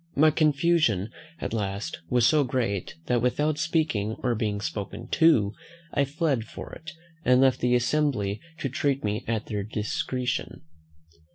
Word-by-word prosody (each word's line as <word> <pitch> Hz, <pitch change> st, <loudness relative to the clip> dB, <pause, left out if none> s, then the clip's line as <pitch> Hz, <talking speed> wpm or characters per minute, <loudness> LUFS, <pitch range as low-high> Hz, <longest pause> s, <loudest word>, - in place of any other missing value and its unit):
My 155 Hz, +2 st, +5 dB
confusion 150 Hz, -, +2 dB, 0.3 s
at -, -, -4 dB
last 100 Hz, -1 st, -3 dB
was 125 Hz, -2 st, +3 dB
so 150 Hz, +3 st, +5 dB
great, 115 Hz, -7 st, -2 dB
that, 120 Hz, -1 st, +1 dB
without 150 Hz, +5 st, +1 dB
speaking, 155 Hz, -10 st, 0 dB
or 125 Hz, -2 st, +2 dB
being 105 Hz, -2 st, -1 dB
spoken 100 Hz, -1 st, -5 dB
to, 120 Hz, -12 st, +4 dB, 0.4 s
I 140 Hz, -1 st, +2 dB
fled 140 Hz, -4 st, 0 dB
for -, -, -9 dB
it, 160 Hz, -1 st, -9 dB, 0.3 s
and 125 Hz, 0 st, +5 dB
left 130 Hz, -1 st, +4 dB
the 125 Hz, 0 st, +2 dB
assembly 120 Hz, -6 st, +1 dB, 0.2 s
to -, -, 0 dB
treat 140 Hz, +1 st, 0 dB
me 105 Hz, 0 st, -1 dB
at 110 Hz, -2 st, -1 dB
their 105 Hz, -2 st, -3 dB
discretion. 110 Hz, +5 st, -3 dB
125 Hz, 150 wpm, -26 LUFS, 105-150 Hz, 0.4 s, My